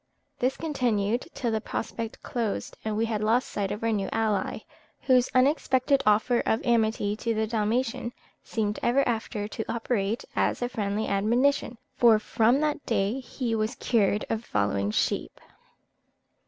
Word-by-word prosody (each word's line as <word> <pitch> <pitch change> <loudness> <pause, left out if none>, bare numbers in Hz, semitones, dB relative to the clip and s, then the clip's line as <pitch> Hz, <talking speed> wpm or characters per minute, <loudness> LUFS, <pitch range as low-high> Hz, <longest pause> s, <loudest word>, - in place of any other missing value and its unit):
This 255 +2 0
continued 240 -7 0
till 240 -3 -1
the 220 -1 0
prospect 225 +1 -5
closed, 230 -4 -3
and 215 -1 -2
we 225 - +2
had 215 -2 -2
lost 230 +4 +2
sight 200 -2 -2
of 210 - -5
our 230 - +2
new 200 -3 -1
ally, 215 -3 0 0.4
whose 255 -2 +3
unexpected 265 0 +3
offer 220 +3 +4
of 220 - 0
amity 220 -3 +2
to 230 0 -1
the 220 0 +1
Dalmatian 230 +2 -1 0.3
seemed 210 -2 -2
ever 265 +3 +2
after 220 -3 -2
to 220 - -4
operate 225 -2 -1
as - - +1
a 245 - -1
friendly 210 -2 -2
admonition, 235 +5 +1 0.2
for 230 -3 +6
from 225 +5 +2
that 300 -1 -1
day 210 +2 0
he 250 -2 -3
was 220 +2 -1
cured 210 -3 +1
of 225 0 -2
following 100 - 0
sheep." 105 - -1
225 Hz, 155 wpm, -27 LUFS, 210-245 Hz, 0.4 s, for